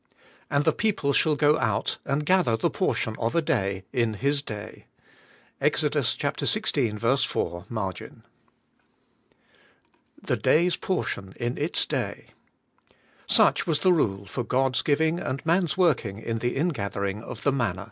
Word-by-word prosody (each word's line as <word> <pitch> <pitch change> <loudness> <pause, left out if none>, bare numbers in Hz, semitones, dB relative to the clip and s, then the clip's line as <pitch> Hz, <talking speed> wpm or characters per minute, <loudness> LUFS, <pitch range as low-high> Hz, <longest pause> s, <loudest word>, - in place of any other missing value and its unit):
'And 140 +1 +1
the 160 - +4
people 200 -10 0
shall 155 +1 +3
go 150 +1 +3
out 110 -5 0
and 150 +2 -1
gather 175 -10 +3
the - - 0
portion 110 - -1
of 115 +4 -1
a 170 - +4
day 100 - -1
in 115 -4 +1
his 140 +5 0
day.' 105 -7 -8 0.4
— - - -31
Ex. - - +2
xvi. 120 +2 +1
4 85 +1 -3
(marg.). 100 -6 -3
^Y^HE - - -12 2.0
day^s 175 +2 +2
portion 100 - -3
in 120 +1 -2
its 155 +5 0
day: - - -4 1.0
Such - - +4
was 150 -3 +1
the 185 - +5
rule 100 - 0
for 120 +6 -4
God's 130 +1 +1
giving 160 +3 +1
and 135 -1 -4
man's 170 -1 +1
working 140 - +2
in 115 +1 -3
the 120 +2 -1
ingathering 100 - -2
of - - -9
the 140 - +3
manna. 115 -9 -1
130 Hz, 145 wpm, -26 LUFS, 110-155 Hz, 2.0 s, the